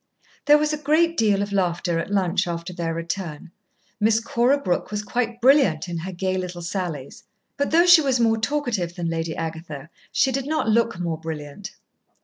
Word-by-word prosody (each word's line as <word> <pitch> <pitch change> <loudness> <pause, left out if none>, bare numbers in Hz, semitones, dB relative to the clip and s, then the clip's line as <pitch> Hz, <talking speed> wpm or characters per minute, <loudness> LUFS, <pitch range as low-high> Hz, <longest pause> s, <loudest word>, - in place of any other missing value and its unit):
There 295 0 +7
was 300 0 0
a 305 - -3
great 325 +3 +2
deal 205 -7 +2
of 205 0 -6
laughter 175 -2 0
at 165 - -4
lunch 190 -1 +1
after 170 +1 -5
their 170 -2 -3
return. 165 -1 -5 0.5
Miss 220 +1 +3
Cora 240 +4 +2
Brooke 185 -12 -2
was 210 +1 -3
quite 235 +2 -2
brilliant 245 - +4
in 170 -1 -4
her 185 +3 -5
gay 185 +1 -2
little 180 -1 -6
sallies. 170 -6 -5 0.3
But 285 - -1
though 340 +2 +5
she 350 -2 +8
was 265 -4 +1
more 225 -1 +2
talkative 225 -9 -2
than 170 -2 -3
Lady 165 -1 -3
Agatha, 160 -2 -6 0.2
she 270 -1 +2
did 270 +1 -2
not 310 -5 -1
look 230 -1 +2
more 165 -3 -2
brilliant. 160 +5 -7
195 Hz, 185 wpm, -23 LUFS, 170-245 Hz, 0.5 s, she